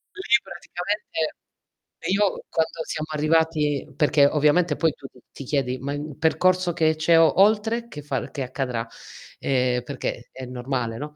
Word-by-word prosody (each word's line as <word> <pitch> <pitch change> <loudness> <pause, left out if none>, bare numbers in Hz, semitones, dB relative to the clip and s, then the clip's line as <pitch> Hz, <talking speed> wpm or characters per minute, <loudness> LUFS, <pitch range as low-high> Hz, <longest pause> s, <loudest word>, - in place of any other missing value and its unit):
Lì 265 -10 +2
praticamente 175 -1 -4 0.7
io 200 +1 +1
quando 160 0 -1
siamo 155 0 -4
arrivati 155 -2 +1
perché 150 -2 +4
ovviamente 150 +3 +3
poi 160 -1 +1
tu 135 - -11
t 130 - -20
ti - - -9
chiedi: 130 -2 -1
"Ma 140 +3 -3
il 145 -1 -6
percorso 180 +2 +2
che 160 -1 +2
c'è 160 +1 +4
o 165 +2 +4
oltre 220 +3 +3
che 150 -10 -8
f 140 -4 -3
che 140 - -5
accadrà?" 125 -2 -3 0.5
Ehm, 125 -2 +1
perché 125 -2 -5
è 130 - -8
normale, 125 -2 -3
no? 150 +3 -7
150 Hz, 155 wpm, -24 LUFS, 135-170 Hz, 0.7 s, perché